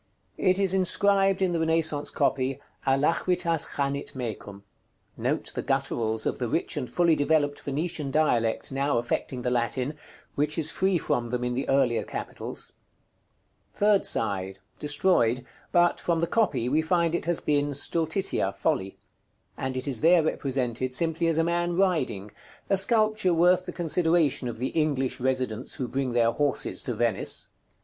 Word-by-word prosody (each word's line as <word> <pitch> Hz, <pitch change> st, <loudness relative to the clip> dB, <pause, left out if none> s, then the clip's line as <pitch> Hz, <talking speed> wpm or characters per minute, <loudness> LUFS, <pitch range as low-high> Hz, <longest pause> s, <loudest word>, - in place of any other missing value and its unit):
It 185 Hz, 0 st, +3 dB
is 195 Hz, -2 st, +2 dB
inscribed 195 Hz, +1 st, +3 dB
in 185 Hz, -, +1 dB
the 170 Hz, -, -1 dB
Renaissance 160 Hz, -2 st, +1 dB
copy, 130 Hz, 0 st, 0 dB, 0.3 s
"ALACHRITAS 165 Hz, +4 st, +1 dB
CHANIT 140 Hz, 0 st, -2 dB
MECUM." 105 Hz, -5 st, -6 dB, 0.5 s
Note -, -, -2 dB
the -, -, -3 dB
gutturals 110 Hz, -1 st, -1 dB
of -, -, -2 dB
the -, -, -1 dB
rich -, -, -1 dB
and 125 Hz, -, -4 dB
fully 170 Hz, -2 st, +3 dB
developed 145 Hz, -1 st, +1 dB
Venetian 150 Hz, +1 st, -3 dB
dialect 125 Hz, -7 st, +1 dB
now 135 Hz, -1 st, 0 dB
affecting 120 Hz, +1 st, -2 dB
the 125 Hz, -, 0 dB
Latin, 125 Hz, +3 st, -1 dB, 0.4 s
which 150 Hz, +2 st, -1 dB
is 160 Hz, -1 st, +4 dB
free 190 Hz, -1 st, +1 dB
from 120 Hz, -6 st, -1 dB
them 125 Hz, +1 st, -2 dB
in 125 Hz, 0 st, -1 dB
the 130 Hz, +3 st, -3 dB
earlier 135 Hz, -4 st, +2 dB
capitals. -, -, -6 dB
§ -, -, -3 dB
XCVII. -, -, -23 dB
Third 205 Hz, -1 st, +3 dB
side. 95 Hz, -3 st, -1 dB, 0.2 s
Destroyed; 145 Hz, -6 st, +2 dB, 0.3 s
but, 175 Hz, 0 st, +3 dB
from 170 Hz, -1 st, 0 dB
the 170 Hz, -, +1 dB
copy, 165 Hz, -, 0 dB
we 150 Hz, +5 st, +2 dB
find 170 Hz, 0 st, +1 dB
it 170 Hz, -, -1 dB
has 175 Hz, 0 st, +1 dB
been 145 Hz, -1 st, 0 dB
Stultitia, 160 Hz, -, -1 dB
Folly; 95 Hz, +1 st, -1 dB, 0.6 s
and 130 Hz, 0 st, -4 dB
it 130 Hz, -, -4 dB
is 130 Hz, -5 st, 0 dB
there 170 Hz, 0 st, +5 dB
represented 130 Hz, -4 st, -1 dB
simply 165 Hz, +1 st, +1 dB
as 165 Hz, -1 st, +1 dB
a 165 Hz, -, +3 dB
man 175 Hz, +1 st, 0 dB
riding, 145 Hz, -, 0 dB, 0.4 s
a -, -, +5 dB
sculpture 215 Hz, -3 st, +3 dB
worth 180 Hz, +2 st, +3 dB
the -, -, -3 dB
consideration 165 Hz, -5 st, +1 dB
of 120 Hz, -, -5 dB
the 125 Hz, +3 st, -2 dB
English 135 Hz, -5 st, -1 dB
residents 130 Hz, -2 st, -2 dB
who 130 Hz, -, -3 dB
bring 130 Hz, -1 st, -2 dB
their 115 Hz, -1 st, +3 dB
horses 145 Hz, +2 st, -1 dB
to 125 Hz, -, -4 dB
Venice. 115 Hz, -3 st, -1 dB
145 Hz, 160 wpm, -26 LUFS, 125-170 Hz, 0.6 s, there